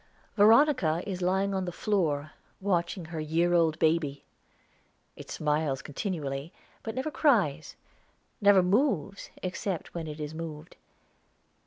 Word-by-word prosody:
Veronica 215 - +4
is 185 -2 -4
lying 190 +2 +1
on 190 -1 -1
the 175 - -3
floor 155 -7 -1 0.3
watching 180 -2 -1
her 160 0 -6
year 165 +3 +1
old 165 -2 +3
baby. 155 -3 0 0.9
It - - -11
smiles 150 -3 -1
continually, 145 -3 -4 0.3
but 225 0 -6
never 265 +4 -2
cries, 195 - +1 0.7
never 200 -2 +6
moves, 200 - 0
except 185 0 -4
when 165 -2 -5
it 150 0 -7
is 150 0 -5
moved. 160 0 -7
170 Hz, 125 wpm, -28 LUFS, 155-200 Hz, 0.9 s, never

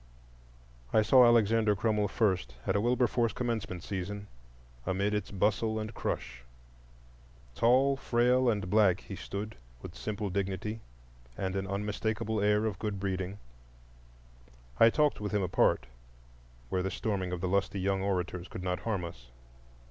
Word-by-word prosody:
I 110 - +4
saw 125 +3 +7
Alexander 115 -2 +4
Crummell 105 0 +1
first 95 - 0
at 95 - 0
a 100 - +2
Wilberforce 120 -1 +2
commencement 115 -8 -3
season, 100 +1 -4 0.6
amid 100 +6 0
its 105 -1 -2
bustle 110 +3 0
and 110 +1 -5
crush. - - -4 1.1
Tall, 130 - +3
frail, 125 0 +3
and 105 -5 -1
black 100 -2 +4
he 100 - -8
stood, 100 +3 -6 0.3
with - - -8
simple 105 -2 -4
dignity 100 +3 -2 0.6
and 95 -1 -2
an 95 0 -2
unmistakable 105 +2 -2
air 105 +1 +3
of 105 -4 -2
good 105 -3 -3
breeding. 95 0 -3 1.4
I 115 - +8
talked 150 -1 +1
with 105 0 -3
him 105 -2 +1
apart, 85 -8 +2 0.8
where 90 - 0
the 95 - -1
storming 95 -2 -2
of 90 - -3
the 90 - -2
lusty 100 +1 0
young 95 0 0
orators 90 -2 -2
could 90 - -7
not 90 -1 -1
harm 100 -6 -2
us. 65 -8 -10
105 Hz, 145 wpm, -30 LUFS, 95-110 Hz, 1.4 s, I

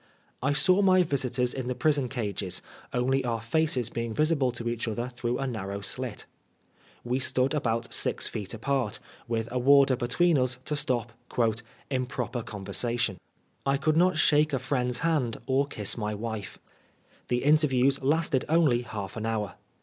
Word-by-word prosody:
I 135 +3 +1
saw 185 +7 +4
my 185 -2 +5
visitors 125 -5 0
in 130 -2 -4
the 125 - -1
prison 145 -4 +1
cages, 105 -7 -2 0.3
only 130 +2 +1
our 115 -2 -1
faces 125 0 0
being 115 -1 -3
visible 150 -4 +2
to 120 -1 -5
each 120 0 -2
other 120 +3 -2
through 120 0 -2
a 135 - -2
narrow 100 -5 -4
slit. 120 +1 -3 0.8
We 125 +2 -1
«tood 130 +1 +1
about 115 -5 -1
six - - 0
feet 100 -1 -4
apart, 125 -1 -1 0.3
with 115 -1 -1
a 125 - 0
warder 140 +1 +6
between 135 +5 +2
ns 125 0 0
to 150 - -1
stop 125 -5 0 0.2
'^ 115 -2 +1 0.3
improper 125 -2 -2
conversation." 115 -1 -2 0.4
I 135 0 +2
could 155 +2 +1
not 180 +1 +4
shake 150 0 +4
a - - +3
friend's 125 -2 -1
hand 150 -8 +1
or 135 +2 +2
kiss 105 -7 -2
my 105 -2 -2
wife. 110 -2 -5 0.7
The 125 0 0
interviews 140 -3 +3
lasted 145 -1 +1
only 155 -7 +4
half 105 -5 -6
an 110 0 -3
hour. 110 -3 -2
125 Hz, 165 wpm, -28 LUFS, 115-140 Hz, 0.8 s, warder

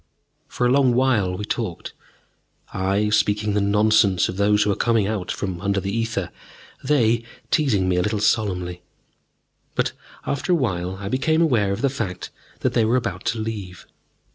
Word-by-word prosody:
For 125 - -2
a 120 - +3
long 130 -2 +4
while 115 -8 +2
we 105 - -4
talked, 110 -6 -4 0.8
I 100 +3 0
speaking 105 0 +1
the 105 - +1
nonsense 100 -2 +3
of 95 - -5
those 105 +1 +3
who 105 - +1
are - - 0
coming 115 -2 +2
out 100 -3 -3
from 95 -3 -4
under 100 -1 0
ether, 100 -2 -2 0.5
they 120 -5 +2 0.3
teasing 120 - +2
me 90 -1 +1
a - - +3
little 105 +3 -1
solemnly. 90 -5 0 0.9
But - - +1 0.3
after 160 +6 -1
a - - +5
little 155 - 0
while 90 -1 -3
I 100 +1 -7
became 160 +8 +2
aware 115 -11 +2
of 100 - -3
the - - +4
fact 105 -9 -5 0.3
that - - 0
they 115 - +3
were 110 +3 +2
about 120 - -4
to 115 - 0
leave. 105 -5 -6
105 Hz, 175 wpm, -22 LUFS, 95-120 Hz, 0.9 s, a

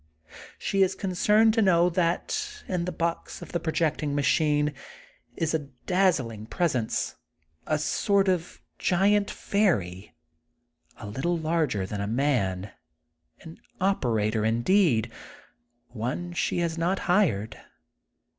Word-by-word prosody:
She 195 - 0
is 190 0 +3
concerned 210 +4 +3
to 225 - +2
know 175 -4 +4
that 420 - -1
in 180 -2 -1
the 180 - -2
box 170 0 -3
of - - -11
the 170 - -1
projecting 155 -3 -1
machine 150 +1 +2 0.6
is 165 -2 -1
a 150 -3 -2 0.2
dazzling 135 - +1
presence, 130 -8 -1 0.5
a 155 - +1
sort 195 +6 +1
of 180 -2 -1 0.2
giant 200 +3 +2
fairy, 95 - -1 0.8
a - - -9
little 135 +12 -1
larger 155 - 0
than 100 +1 -4
a 100 - -2
man, 105 -7 0 0.7
an 160 0 -12 0.2
operator, 115 - +1
indeed, 120 - +2 0.8
one 130 +10 -4
she 175 - -1
has 165 -1 -2
not 180 +3 +1
hired. 140 - +1
165 Hz, 115 wpm, -26 LUFS, 115-185 Hz, 0.8 s, know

